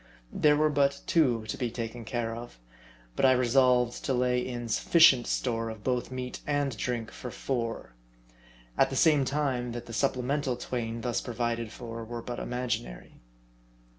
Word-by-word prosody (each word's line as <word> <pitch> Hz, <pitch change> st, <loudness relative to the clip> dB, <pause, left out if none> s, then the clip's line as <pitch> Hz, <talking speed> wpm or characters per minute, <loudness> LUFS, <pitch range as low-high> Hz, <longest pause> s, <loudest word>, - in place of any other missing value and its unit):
There 150 Hz, -1 st, +4 dB
were 155 Hz, 0 st, +3 dB
but 140 Hz, -1 st, +2 dB
two 125 Hz, -9 st, +2 dB
to -, -, -4 dB
be 125 Hz, -, 0 dB
taken 115 Hz, 0 st, -6 dB
care 115 Hz, -1 st, -2 dB
of; 120 Hz, -, -9 dB, 0.6 s
but -, -, -2 dB
I 130 Hz, -1 st, +7 dB
resolved? 125 Hz, -1 st, +3 dB
to 135 Hz, -, +1 dB
lay 125 Hz, 0 st, +2 dB
in 120 Hz, -1 st, -4 dB
sufficient 130 Hz, +1 st, +5 dB
store 115 Hz, -2 st, -1 dB
of 110 Hz, -2 st, -9 dB
both 125 Hz, -2 st, -1 dB
meat 130 Hz, -1 st, -5 dB
and 145 Hz, -3 st, 0 dB
drink 115 Hz, +1 st, -3 dB
for 125 Hz, -, -7 dB
four; 115 Hz, -, -3 dB, 0.9 s
at -, -, +5 dB
the -, -, -4 dB
same 150 Hz, -4 st, +4 dB
time 130 Hz, -4 st, -1 dB
that 120 Hz, 0 st, -6 dB
the 115 Hz, -, -9 dB
supplemental 130 Hz, +1 st, 0 dB
twain 115 Hz, -2 st, -4 dB
thus 120 Hz, 0 st, -1 dB
provided 115 Hz, -2 st, -2 dB
for 115 Hz, -1 st, -7 dB
were 115 Hz, +1 st, -6 dB
but 120 Hz, -1 st, -5 dB
imaginary. 125 Hz, -, -4 dB
125 Hz, 165 wpm, -29 LUFS, 115-130 Hz, 0.9 s, I